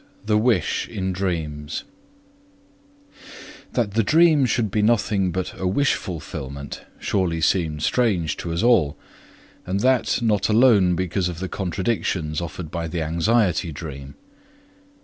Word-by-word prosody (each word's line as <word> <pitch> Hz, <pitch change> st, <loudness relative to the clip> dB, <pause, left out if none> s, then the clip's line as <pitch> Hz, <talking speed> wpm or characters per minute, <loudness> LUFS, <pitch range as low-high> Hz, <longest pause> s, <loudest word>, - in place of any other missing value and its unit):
p. -, -, -30 dB
2. -, -, -32 dB
VI -, -, -30 dB
THE 105 Hz, 0 st, +2 dB
WISH 110 Hz, -7 st, +1 dB
IN 95 Hz, -1 st, -3 dB
DREAMS 80 Hz, -5 st, -3 dB, 1.9 s
That 115 Hz, -5 st, 0 dB
the 115 Hz, -, +3 dB
dream 155 Hz, +3 st, +4 dB
should 110 Hz, -3 st, 0 dB
be 105 Hz, -, +1 dB
nothing 105 Hz, -4 st, +2 dB
but 95 Hz, +1 st, -3 dB
a 95 Hz, -, -1 dB
wish 135 Hz, +10 st, +2 dB
fulfillment 70 Hz, -5 st, -6 dB
surely 90 Hz, -4 st, -1 dB
seemed 80 Hz, -2 st, 0 dB
strange 95 Hz, -, +1 dB
to 85 Hz, -, -5 dB
us 85 Hz, +5 st, -1 dB
all 85 Hz, -12 st, +3 dB, 0.7 s
and 95 Hz, +2 st, -2 dB
that 130 Hz, -1 st, +2 dB
not 105 Hz, -3 st, +1 dB
alone 105 Hz, -6 st, +5 dB
because 90 Hz, +1 st, -1 dB
of 85 Hz, -, -6 dB
the 95 Hz, -, -3 dB
contradictions 90 Hz, -4 st, -2 dB
offered 85 Hz, -1 st, -6 dB
by 85 Hz, -1 st, -3 dB
the 80 Hz, 0 st, -3 dB
anxiety 85 Hz, +2 st, +1 dB
dream. 70 Hz, -3 st, -8 dB
95 Hz, 145 wpm, -23 LUFS, 80-110 Hz, 1.9 s, alone